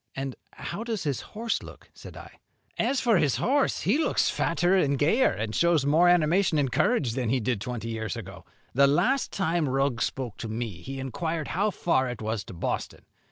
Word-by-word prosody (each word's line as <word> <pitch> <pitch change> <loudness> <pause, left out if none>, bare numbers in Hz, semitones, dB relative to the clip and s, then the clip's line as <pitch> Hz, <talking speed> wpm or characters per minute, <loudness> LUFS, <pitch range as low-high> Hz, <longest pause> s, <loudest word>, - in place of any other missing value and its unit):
"And 135 -1 -4 0.2
how 200 +6 -5
does 225 -5 -3
his 140 -5 -2
horse 225 +2 -3
look?" - - -13
said - - -12
I. - - -12 0.4
"As 270 - +1
for 230 -5 +3
his 140 -7 +2
horse, 270 - +1
he 225 - +2
looks 320 - +2
fatter 175 +2 +1
and 140 -7 +2
gayer, 165 - +3
and 110 +1 -3
shows 170 -2 +3
more 160 +5 +5
animation 175 0 +3
and 140 -3 +1
courage, 200 - +2
than 120 -1 -2
he 130 +2 +2
did 115 -2 -1
twenty 120 -1 -4
years 110 0 -3
ago. 95 -5 -9 0.3
The 140 +2 +5
last 250 - +2
time 170 -5 0
Rugg 135 -2 0
spoke 125 -5 -3
to 115 - -5
me 110 -5 -5
he 135 +5 -6
inquired 160 +4 -3
how 200 +5 +1
far 150 -9 0
it 125 - -6
was 110 -1 -3
to - - -10
Boston. 85 - -4
140 Hz, 200 wpm, -27 LUFS, 120-180 Hz, 0.4 s, more